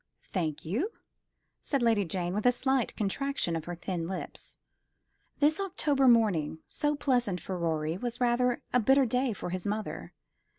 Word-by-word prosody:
"Thank 160 -6 -2
you," 255 - -1 0.7
said 275 -4 -1
Lady 225 -4 +3
Jane, 175 +1 -2
with 210 +4 +1
a - - +7
slight 260 0 0
contraction 220 -3 -1
of 165 -1 -4
her 175 - -4
thin 170 -1 -3
lips. 190 +1 -7 0.8
This 300 +3 +3
October 295 -8 +1
morning, 205 -11 +3
so 295 0 0
pleasant 245 -10 +1
for 185 - -5
Rorie, 165 -1 -1
was 240 +1 -3
rather 245 0 +2
a 250 - +5
bitter 270 +4 +4
day 250 +2 +1
for 190 -4 -5
his 185 +1 -3
mother. 210 +1 -4
225 Hz, 160 wpm, -30 LUFS, 180-260 Hz, 0.8 s, a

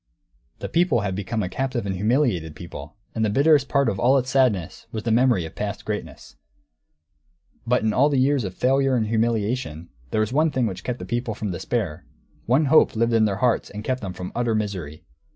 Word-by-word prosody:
The - - -5
people 165 -9 +2
had 100 -2 -2
become 100 +3 -2
a - - -2
captive 130 +3 -2
and 95 - -2
humiliated 100 - 0
people; 75 -4 -9 0.2
and 110 - -1
the 110 - +2
bitterest 140 +4 +3
part 140 -1 +2
of 95 - -1
all 130 +5 +4
its 130 0 -1
sadness 105 -10 +1
was 110 -1 -4
the 115 - -1
memory 120 -6 +3
of 80 - -9
past - - -5
greatness. - - -6 1.3
But 125 -1 +2
in 110 -1 +1
all 140 +6 +4
the 140 - +1
years 135 0 +2
of 95 -2 -5
failure 135 +2 +2
and 115 -3 +1
humiliation, 110 -6 -1 0.2
there 110 - 0
was 110 +3 -1
one 155 +3 +3
thing 130 -4 0
which 95 -5 -4
kept 125 -1 -3
this - - -8
people 120 -2 -2
from 105 -2 -3
despair; 90 -3 -3 0.4
one 135 +6 +3
hope 150 -2 +4
lived 115 +1 +1
in 110 -1 +4
their 100 -2 0
hearts 120 - +1
and 105 +1 -7
kept 130 +2 -2
them 95 -3 -5
from 90 -1 -7
utter 120 -2 0
misery. 90 -7 -4
115 Hz, 210 wpm, -23 LUFS, 100-130 Hz, 1.3 s, all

